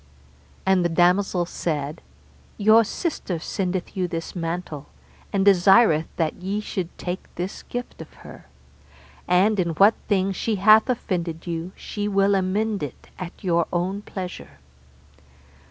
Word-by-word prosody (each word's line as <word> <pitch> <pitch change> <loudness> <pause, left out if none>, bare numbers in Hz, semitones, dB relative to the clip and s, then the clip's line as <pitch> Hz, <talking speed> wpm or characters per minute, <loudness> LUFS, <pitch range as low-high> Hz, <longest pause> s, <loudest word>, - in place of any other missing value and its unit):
And 190 -1 +3
the 175 - +1
damosel 180 +1 +2
said, 150 -4 -3 0.6
Your 220 +2 +6
sister 220 - -3
sendeth 180 +2 -3
you 185 -2 0
this 165 +1 -5
mantle, 165 -4 -4 0.4
and 195 -1 +1
desireth 190 -3 +5
that 160 -2 0
ye 195 +3 -2
should 185 -4 -5
take 180 +1 -5
this 180 +3 -5
gift 245 0 -7
of - - -11
her; - - -12 0.8
and 190 +4 +3
in 175 -2 +1
what 205 +3 +7
thing 195 -1 +1
she 215 +3 -1
hath 215 +4 +5
offended 175 -9 -2
you, 170 +1 -4
she 205 -1 -4
will 200 0 +3
amend 200 +2 0
it 145 -4 -8
at 180 +2 -8
your 170 -3 +1
own 185 +3 -1
pleasure. 180 - -8
185 Hz, 140 wpm, -23 LUFS, 175-200 Hz, 0.8 s, what